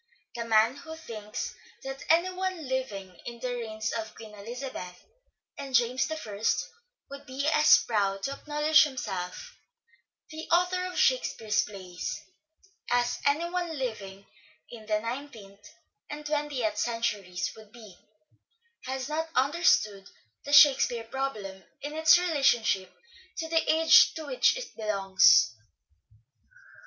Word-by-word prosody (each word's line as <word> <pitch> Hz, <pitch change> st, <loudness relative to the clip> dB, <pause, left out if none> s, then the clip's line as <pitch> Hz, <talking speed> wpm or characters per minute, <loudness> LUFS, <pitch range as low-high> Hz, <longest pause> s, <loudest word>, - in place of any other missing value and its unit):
The 235 Hz, -1 st, -5 dB
man 225 Hz, +3 st, +3 dB
who 320 Hz, +1 st, -9 dB
thinks 215 Hz, -9 st, -6 dB, 0.3 s
that 270 Hz, 0 st, -7 dB
any 340 Hz, +3 st, +3 dB
one 370 Hz, -4 st, -4 dB
living 200 Hz, -9 st, -4 dB
in 235 Hz, -1 st, -7 dB
the 250 Hz, 0 st, -3 dB
reigns 220 Hz, -2 st, -4 dB
of 220 Hz, -1 st, -5 dB
Queen 220 Hz, -1 st, -12 dB
Elizabeth 210 Hz, -4 st, -8 dB, 0.5 s
and 275 Hz, -2 st, -4 dB
James 245 Hz, +4 st, +2 dB
I 215 Hz, -10 st, -6 dB, 0.7 s
would 280 Hz, +1 st, -10 dB
be 270 Hz, +3 st, -3 dB
as 300 Hz, 0 st, +6 dB
proud 195 Hz, -3 st, -1 dB
to 275 Hz, -, -2 dB
acknowledge 300 Hz, +2 st, +3 dB
himself 195 Hz, -11 st, -5 dB, 0.8 s
the 315 Hz, +1 st, -8 dB
author 360 Hz, +1 st, +2 dB
of 365 Hz, -, -6 dB
"Shakespeare's" 225 Hz, -, +1 dB
plays 185 Hz, -3 st, -6 dB, 0.7 s
as 245 Hz, 0 st, +1 dB
any 305 Hz, +4 st, +1 dB
one 345 Hz, -3 st, -3 dB
living 200 Hz, -6 st, -5 dB, 0.5 s
in 220 Hz, -3 st, -11 dB
the 215 Hz, -1 st, +1 dB
nineteenth 230 Hz, -4 st, -8 dB, 0.4 s
and 300 Hz, 0 st, -7 dB
twentieth 290 Hz, -8 st, -2 dB
centuries 210 Hz, -6 st, -2 dB
would 215 Hz, -1 st, -15 dB
be, 215 Hz, -5 st, -14 dB, 0.9 s
has 260 Hz, 0 st, -4 dB
not 320 Hz, +2 st, -3 dB
understood 255 Hz, -, +2 dB, 0.4 s
the 285 Hz, -, -5 dB
Shakespeare 270 Hz, -5 st, +6 dB
problem 220 Hz, -7 st, -5 dB, 0.2 s
in 290 Hz, +1 st, -5 dB
its 320 Hz, +2 st, +6 dB
relationship 270 Hz, -, +1 dB, 0.5 s
to 325 Hz, -, -3 dB
the 325 Hz, 0 st, +2 dB
age 320 Hz, +1 st, +6 dB
to 315 Hz, -, -6 dB
which -, -, +2 dB
it -, -, -8 dB
belongs. 195 Hz, -, +4 dB
250 Hz, 125 wpm, -28 LUFS, 210-300 Hz, 0.9 s, as